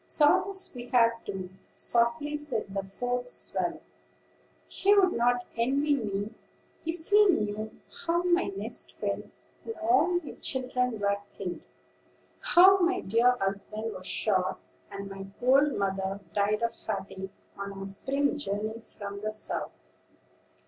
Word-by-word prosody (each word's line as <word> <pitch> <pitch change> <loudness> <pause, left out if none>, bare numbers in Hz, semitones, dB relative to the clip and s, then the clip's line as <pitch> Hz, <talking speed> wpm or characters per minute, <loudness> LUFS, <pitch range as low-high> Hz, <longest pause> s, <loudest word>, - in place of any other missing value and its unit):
"Sorrows 375 +5 +3
we 245 0 -7
have, 230 -2 +3
too," 185 -2 -5 0.2
softly 235 +5 +1
said 255 -9 -3
the 195 -1 -1
fourth 245 +5 -3
swallow. - - -1 0.9
"He 405 +2 +3
would 375 -3 +5
not 245 +1 +2
envy 275 +6 +2
me, 210 -4 -2 0.5
if 325 0 -5
he 415 +1 +7
knew 215 - +1 0.4
how 340 +1 +2
my 360 0 +3
nest - - -4
fell, - - -2 0.4
and 455 - -5
all 355 +1 +3
my - - -7
children 250 -3 -1
were 200 0 +1 0.2
killed; 180 -3 -4 0.8
how 380 +3 +7
my 370 +1 +2
dear 240 +4 +3
husband 210 +3 -3
was 185 0 -8
shot, 185 -4 +1 0.3
and 200 0 -6
my 195 0 -8
old 275 +3 +4
mother 195 0 -1
died 210 +2 +1
of 235 - +1
fatigue 190 -2 -5 0.3
on 200 0 -5
our 195 0 -6
spring 275 +9 -1
journey 215 -1 -3
from 200 -2 -8
the 215 +1 -3
South." 215 0 -2
235 Hz, 135 wpm, -29 LUFS, 200-295 Hz, 0.9 s, he